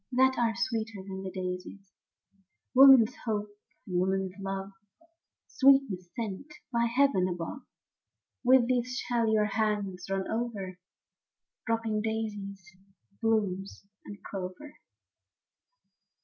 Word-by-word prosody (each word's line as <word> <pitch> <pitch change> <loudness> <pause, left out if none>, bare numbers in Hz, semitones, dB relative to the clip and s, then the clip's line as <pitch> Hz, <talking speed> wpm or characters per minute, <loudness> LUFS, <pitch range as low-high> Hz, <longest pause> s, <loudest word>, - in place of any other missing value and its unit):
That 260 +1 +4
are 230 -1 +1
sweeter 225 -4 -2
than 190 -1 -6
the 190 - -5
daisies; 185 +1 -6 0.8
Woman's 260 -3 +8
hopes 210 -2 -2 0.3
and 180 -3 -1
woman's 190 0 0
love, 195 0 -4 0.7
Sweetness 265 -10 +3
sent 230 +6 -5 0.2
by 235 0 +2
heaven 235 -6 +3
above, 175 +9 -5 0.4
— - - -61
With 250 -1 +5
these 250 0 0
shall 235 -3 0
your 215 -1 +3
hands 205 -3 -2
run 195 0 -1
over. 210 -6 -4 0.9
Dropping 225 -2 0
daisy 215 -2 -3 0.7
blooms 200 -4 -1 0.2
and 205 - -9
clover. 195 +10 -7
215 Hz, 105 wpm, -29 LUFS, 195-235 Hz, 0.9 s, Woman's